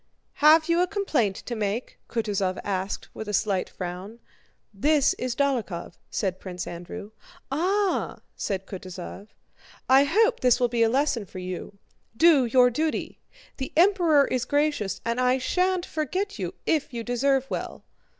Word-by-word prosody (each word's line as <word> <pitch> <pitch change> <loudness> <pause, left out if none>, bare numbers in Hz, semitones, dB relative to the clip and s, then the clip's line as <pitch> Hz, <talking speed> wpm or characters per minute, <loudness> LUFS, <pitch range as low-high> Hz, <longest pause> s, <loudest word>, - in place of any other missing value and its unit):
"Have 315 +2 +7
you 335 +1 +3
a 360 - +2
complaint 285 - 0
to 240 - -6
make?" 215 +2 -3
Kutúzov 200 -5 -1
asked 190 -1 -3
with 220 - -6
a 210 - +1
slight 195 -3 0
frown. 185 +5 -7 0.6
"This 285 +7 +3
is 250 -1 -2
Dólokhov," 245 -11 -1 0.2
said 185 -3 -2
Prince 180 -2 -6
Andrew. 175 +4 -8 0.4
"Ah!" 375 +7 0 0.2
said 195 -1 -3
Kutúzov. 185 +1 -8 0.6
"I 270 +2 +6
hope 445 +10 +3
this 250 -1 +3
will 245 -1 +2
be 235 0 0
a 225 - +5
lesson 255 -4 0
to 185 - -9
you. 185 +2 -6 0.4
Do 315 -5 +6
your 250 +1 +5
duty. 310 +5 -2 0.4
The 265 - -4
Emperor 340 -6 +5
is 255 -2 -1
gracious, 290 -9 0
and 235 +2 0
I 255 +1 +3
shan't 365 +6 0
forget 375 +6 -3
you - - -4
if 305 -4 0
you 235 -2 -4
deserve 265 +3 +1
well." - - -5
250 Hz, 150 wpm, -26 LUFS, 200-305 Hz, 0.6 s, Have